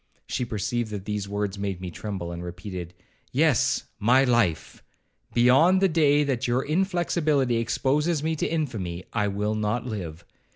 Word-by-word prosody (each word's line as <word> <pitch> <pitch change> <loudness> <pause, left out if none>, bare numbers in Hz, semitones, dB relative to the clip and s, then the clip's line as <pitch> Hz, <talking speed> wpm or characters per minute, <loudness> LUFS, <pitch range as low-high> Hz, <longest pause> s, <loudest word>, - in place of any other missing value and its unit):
She 130 -2 -2
perceived 115 +1 -2
that 100 -2 -6
these 105 -1 -3
words 100 -1 -2
made 100 -2 -3
me 90 -1 -6
tremble, 95 -2 -5
and 85 0 -6
repeated, 90 0 -7 0.4
'Yes, - - +2 0.2
my 125 +5 +4
life; 120 -10 +1 0.5
beyond 135 +10 +5
the 195 - +4
day 150 -4 +3
that 130 -3 -1
your 125 +2 +1
inflexibility 155 -6 +1
exposes 145 +7 0
me 160 0 0
to - - 0
infamy, 110 - -3
I 105 -3 +1
will 105 +2 -1
not 110 +3 -1
live. 90 -8 -6
115 Hz, 155 wpm, -25 LUFS, 100-145 Hz, 0.5 s, beyond